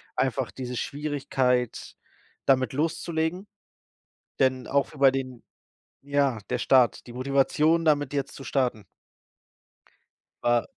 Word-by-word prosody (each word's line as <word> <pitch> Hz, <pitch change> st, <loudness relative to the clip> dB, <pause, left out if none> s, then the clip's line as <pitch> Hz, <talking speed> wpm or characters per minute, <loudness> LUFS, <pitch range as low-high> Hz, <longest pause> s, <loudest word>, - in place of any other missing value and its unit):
einfach 130 Hz, -1 st, -1 dB
diese 125 Hz, -2 st, -6 dB
Schwierigkeit, 135 Hz, -4 st, -1 dB, 0.5 s
damit 130 Hz, -1 st, +2 dB
loszulegen, 165 Hz, +4 st, -2 dB, 0.9 s
denn 130 Hz, -2 st, +2 dB
auch 140 Hz, 0 st, +1 dB
f 145 Hz, -, -14 dB
bei 135 Hz, -1 st, +6 dB
den 130 Hz, -3 st, -5 dB, 0.6 s
ja, 140 Hz, -4 st, +1 dB
der 125 Hz, -, 0 dB
Start, 130 Hz, -1 st, +3 dB
die 120 Hz, -, -10 dB
Motivation, 140 Hz, +5 st, +2 dB
damit 145 Hz, -3 st, +2 dB
jetzt 140 Hz, -1 st, -2 dB
zu 135 Hz, -, -10 dB
starten. 120 Hz, -7 st, -1 dB, 1.6 s
Wa 120 Hz, -1 st, +2 dB
135 Hz, 110 wpm, -26 LUFS, 125-145 Hz, 1.6 s, bei